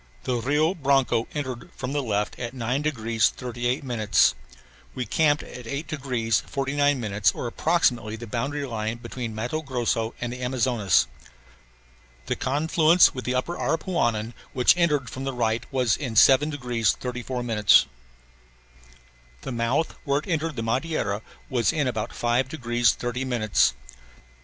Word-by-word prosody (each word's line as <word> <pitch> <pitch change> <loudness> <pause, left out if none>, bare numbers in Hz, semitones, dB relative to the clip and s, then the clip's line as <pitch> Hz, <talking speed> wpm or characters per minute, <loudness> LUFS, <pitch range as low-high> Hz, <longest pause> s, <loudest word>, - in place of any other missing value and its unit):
The 125 -1 -1
Rio 150 +8 +1
Branco 135 -7 +1
entered 130 -5 -4
from 130 +1 -4
the 145 - 0
left 105 -4 -2
at 120 +1 -5
9 125 +3 -1
degrees 115 -6 +1
38 125 +1 -3
minutes. 110 -6 +3 0.6
We 125 - -2
camped 145 +5 +2
at 125 -2 -10
8 140 +6 -3
degrees 125 -7 0
49 140 0 0
minutes 105 -2 +1
or - - -4
approximately 120 -4 +1
the 115 +1 -8
boundary 140 +6 -3
line 110 -2 -3
between 120 -1 -6
Matto 120 +8 -2
Grosso 120 -5 -1
and 120 0 -3
Amazonas. 125 -5 +1 1.2
The - - -1
confluence 160 +5 +4
with 130 -2 -6
the 125 - -1
upper 150 +7 -1
Aripuanan, 120 - -1 0.2
which 125 +5 +5
entered 150 -7 +1
from 130 +3 -6
the 135 0 -2
right, 115 -1 0
was 125 -4 +2
in 125 -6 -4
7 135 +6 +6
degrees 120 - 0
34 125 0 -4
minutes. 105 -4 +5 1.6
The - - -6
mouth 120 +6 0
where 140 -1 +1
it - - -15
entered 160 -2 -1
the 115 - -3
Madeira 115 -4 -1 0.3
was 120 -5 +1
in 150 -4 0
about 110 -4 -2
5 120 +2 0
degrees 120 -5 +2
30 120 +1 -3
minutes. 120 -5 +2
125 Hz, 145 wpm, -25 LUFS, 115-140 Hz, 1.6 s, 7